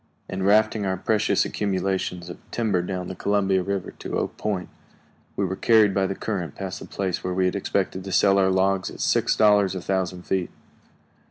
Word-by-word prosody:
] - - -41
In 95 - -3
rafting 105 +2 +3
our 95 -1 -1
precious 105 +3 +1
accumulations 95 -3 -2
of 85 - -8
timber 105 -6 0
down 90 0 -4
the - - -5
Columbia 95 -1 +1
River 100 0 -3
to - - -3
Oak - - -2
Point, 100 -4 -2 0.7
we 100 - 0
were 95 0 -2
carried 110 -1 +4
by 95 -1 +1
the 95 - -3
current 95 -6 -4
past 95 -2 -5
the - - -10
place 95 -3 -3
where 90 0 -2
we 95 0 +2
had 90 - 0
expected 95 -1 -1
to 95 - -5
sell 100 +1 +4
our 95 -1 +3
logs 95 0 +1
at - - -11
six - - +2
dollars 105 -3 +4
a - - -2
thousand 90 -1 -2
feet. 95 -1 -1
95 Hz, 200 wpm, -24 LUFS, 95-100 Hz, 0.7 s, carried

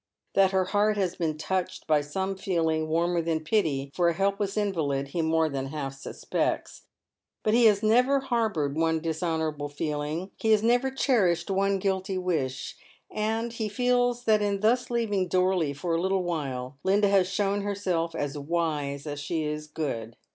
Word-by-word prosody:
That 195 -1 +5
her 190 -1 +1
heart 205 +2 +2
has 185 -3 0
been 160 -3 -2
touched 185 +3 -2
by 155 -2 +3
some 190 +7 -3
feeling 165 -5 0
warmer 170 +2 +1
than 160 -1 -1
pity 150 -8 0
for 175 -1 +3
a 170 - -1
helpless 200 +2 0
invalid 150 -10 -1
he 170 +4 -1
more 160 0 +2
than 135 -2 -3
half 135 -1 -4
suspects; 135 0 -3 0.6
but 215 - +2
he 235 0 +5
has 210 -1 +4
never 250 +6 +4
harboured 220 - 0
one 160 0 +1
dishonourable 160 -2 -2
feeling, 150 +4 -3
he 220 0 +3
has 215 0 +3
never 245 +3 +3
cherished 200 -10 +1
one 195 +1 +2
guilty 190 0 -1
wish, 155 -8 -2 0.4
and 225 +2 -1
he 220 -2 -3
feels 245 +2 +1
that 215 -3 +3
in 200 -1 0
thus 240 +3 +2
leaving 210 -6 0
Dorley 185 -4 +2
for 155 +5 -3
a 165 - +1
little 190 0 +1
while 135 -6 -4
Linda 200 +2 +3
has 195 -2 +4
shown 200 0 0
herself 185 -5 -1
as 145 -2 -3
wise 145 -2 -2
as 145 -1 -4
she 155 +2 -2
is 150 0 -4
good. 115 -7 -4
180 Hz, 170 wpm, -27 LUFS, 155-205 Hz, 0.6 s, That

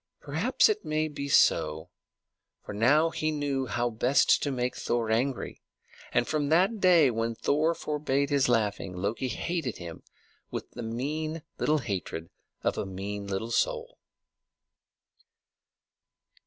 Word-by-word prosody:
Perhaps - - +2
it 430 -1 -1
may 155 0 0
be 140 -2 -5
so, 80 - +3 0.7
for - - -6
now 145 +10 +4
he 155 - -1
knew 140 -3 -1
how 120 +2 -1
best 125 +5 +3
to 145 - 0
make 125 -2 -1
Thor 115 -2 -1
angry; 125 +4 -1 0.5
and 120 - +2
from 150 -2 0
that 190 +7 +3
day 170 -8 +5
when 115 0 -2
Thor 155 +7 +1
forbade 140 -2 -1
his 140 -3 +3
laughing, 105 -6 0
Loki 100 +8 -2
hated 160 -1 -3
him 85 -2 -8 0.5
with - - -6
the 120 - -7
mean 150 +7 -3 0.2
little 155 - +2
hatred 95 - -4 0.3
of - - 0
a - - -2
mean 100 +2 -5
little 100 +4 -3
soul. - - -1
130 Hz, 135 wpm, -28 LUFS, 110-150 Hz, 0.7 s, day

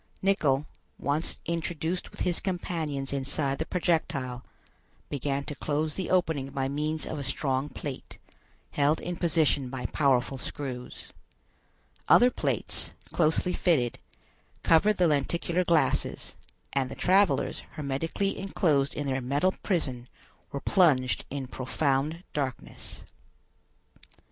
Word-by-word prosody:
Nicholl, 150 -8 +3 0.3
once 145 +4 -1
introduced 170 +1 -2
with - - -10
his 175 -2 +1
companions 160 -7 -2
inside 140 0 -1
the 160 - -2
projectile, 140 -8 0 0.7
began 140 0 -1
to 150 - -5
close 150 +2 -1
the 185 - -3
opening 160 -7 +1
by 135 -1 -1
means 150 +3 -1
of 155 - -4
a - - -3
strong 135 +1 -1
plate, 145 -3 -7 0.5
held 145 +2 +2
in 175 - -4
position 155 -6 +2
by 130 -1 -5
powerful 135 -2 +2
screws. 130 -4 -6 1.0
Other 245 +1 +7
plates, - - -1 0.2
closely 170 +2 +2
fitted, 135 -10 +2 0.6
covered 205 +6 +5
the 180 - +4
lenticular 170 +4 +1
glasses, 170 -3 +1 0.4
and 135 -2 +1
the - - -6
travelers, 195 +2 +3
hermetically 160 +7 -2
enclosed 155 -8 +1
in 145 - -2
their 135 -1 0
metal 145 +9 +2
prison, 130 - -1 0.4
were 140 - -4
plunged 145 -10 +3
in 140 -1 -3
profound 135 +5 -1
darkness. 135 -4 -4
150 Hz, 120 wpm, -28 LUFS, 135-170 Hz, 1.0 s, Other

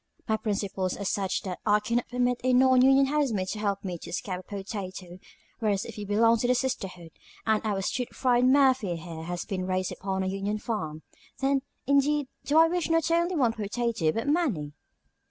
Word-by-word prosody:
My 220 - +2
principles 200 -3 -2
are 200 - -5
such 195 -1 -1
that 185 -2 -5
I 210 0 +4
cannot 235 +3 -1
permit 245 0 0
a 255 0 +2
non 255 0 +5
union 270 +1 +6
housemaid 265 -10 0
to 215 - -4
help 200 -2 -1
me 180 -3 -4
to - - -9
a - - -7
scab 185 0 -4
potato, 195 -3 -6 0.4
whereas, 205 -4 0
if - - -8
you 205 -1 -6
belong 230 +3 +4
to 245 - +1
the 250 - +3
sisterhood, 190 -10 -3 0.3
and 220 -1 +2
our 200 -3 -1
stewed 250 +5 -2
friend 250 0 +3
Murphy 260 -9 +3
here 165 -1 -7
has 175 0 -4
been 185 -2 -3
raised 185 0 -1
upon 190 0 -3
a - - -2
union 195 +2 -2
farm, 160 -9 -4 0.4
then, 275 0 +2 0.2
indeed, 280 +1 +2 0.2
do 295 +3 +2
I 325 0 +8
wish 350 0 -1
not 330 0 +2
only 340 +2 +2
one 245 -7 +2
potato 220 -5 -1
but 225 - -3
many." 255 - 0
215 Hz, 195 wpm, -27 LUFS, 190-260 Hz, 0.4 s, I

